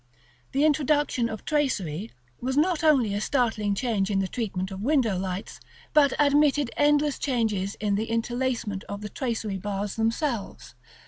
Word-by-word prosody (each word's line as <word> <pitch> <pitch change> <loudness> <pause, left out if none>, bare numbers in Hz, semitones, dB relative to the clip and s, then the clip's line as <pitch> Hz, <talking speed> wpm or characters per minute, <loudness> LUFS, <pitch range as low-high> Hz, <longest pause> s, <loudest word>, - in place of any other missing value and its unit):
The 280 +3 +3
introduction 290 -5 +2
of 220 -1 -7
tracery 215 - -1 0.3
was 265 +2 -2
not 330 +1 +2
only 265 -10 +4
a 205 - -1
startling 220 -6 0
change 210 -4 0
in 200 - +1
the 195 -1 +1
treatment 190 -3 -3
of 190 0 -6
window 250 -5 +2
lights, 185 +2 -4 0.3
but 285 -3 +5
admitted 290 -2 +3
endless 295 0 +2
changes 220 -7 -1
in 210 -1 -1
the 210 +3 0
interlacement 230 -3 -1
of 200 0 -6
the 210 - -5
tracery 220 -6 -3
bars 200 +1 -3
themselves. 225 - -2
230 Hz, 150 wpm, -26 LUFS, 200-280 Hz, 0.3 s, but